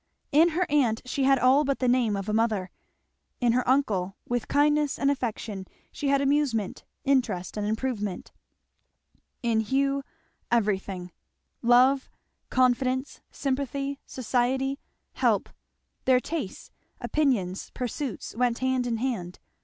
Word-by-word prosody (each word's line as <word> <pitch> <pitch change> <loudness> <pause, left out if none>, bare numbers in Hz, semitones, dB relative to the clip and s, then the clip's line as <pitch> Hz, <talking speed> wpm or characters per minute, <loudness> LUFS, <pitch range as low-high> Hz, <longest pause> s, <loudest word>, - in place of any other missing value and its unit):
In 315 +4 +6
her 365 - +3
aunt 255 -7 +2
she 265 +2 -1
had 270 0 +5
all 260 +4 +5
but 275 -1 0
the 255 - 0
name 245 -4 +3
of 195 0 -4
a 210 - -1
mother; 215 -5 +1 0.7
in 245 -2 +3
her 250 +2 +2
uncle, 205 -9 +1
with 245 -1 -1
kindness 295 0 +2
and 280 0 +2
affection, 220 -7 -4 0.2
she 290 - -4
had 275 0 +3
amusement, 275 -8 0 0.2
interest, 250 -10 0
and 210 -1 -2
improvement; 215 -4 -3 1.1
in 230 -2 +2
Hugh 275 +5 +1 0.5
everything; 195 -5 0 0.5
love, 255 +3 +4 0.4
confidence, 255 +1 +1
sympathy, 275 0 -2
society, 260 +2 0 0.3
help; - - +1 0.6
their 255 -1 +5
tastes, 290 - -5 0.3
opinions, 230 -12 0
pursuits, 250 -3 -4
went 240 0 +1
hand 260 -1 0
in 230 -1 0
hand. 220 -8 -3
250 Hz, 125 wpm, -27 LUFS, 220-275 Hz, 1.1 s, In